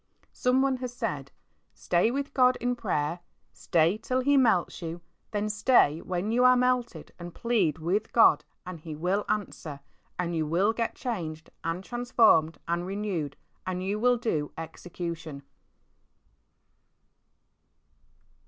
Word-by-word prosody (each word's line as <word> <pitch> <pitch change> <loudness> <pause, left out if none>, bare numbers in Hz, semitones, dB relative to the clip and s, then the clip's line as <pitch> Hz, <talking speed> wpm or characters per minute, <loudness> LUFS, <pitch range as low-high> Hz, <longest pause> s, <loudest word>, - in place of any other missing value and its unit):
Someone 260 +1 +2
has 250 -1 -5
said, 245 - -4 0.4
"Stay 175 +5 +2
with 280 +3 -3
God 255 -1 +4
in 245 +1 -1
prayer, 170 -7 -1 0.3
stay 170 +5 +1
till 255 +2 -1
He 285 +2 +3
melts 225 -12 +2
you, 165 -1 -4
and 170 - -11 0.3
then 210 -1 -1
stay 210 - +3
when 185 +4 -2
you 245 +2 +3
are 255 0 +7
melted 245 -9 0
and 175 0 -8
plead 210 -11 +1
with 185 +7 -1
God, 150 -10 +5 0.2
and 180 -2 -7
He 155 0 -7
will 185 +6 0
answer, 170 -8 -3 0.4
and 175 -1 -2
you 160 -1 0
will 190 +8 +2
get 230 0 -2
changed 165 -10 -5
and 165 +3 -2
transformed 230 -9 +3
and 170 +1 -1
renewed, 190 -8 -3 0.3
and 185 0 -2
you 200 +3 -1
will 245 +2 +3
do 160 -11 -2
execution." 165 -3 -6
190 Hz, 135 wpm, -28 LUFS, 165-240 Hz, 0.4 s, are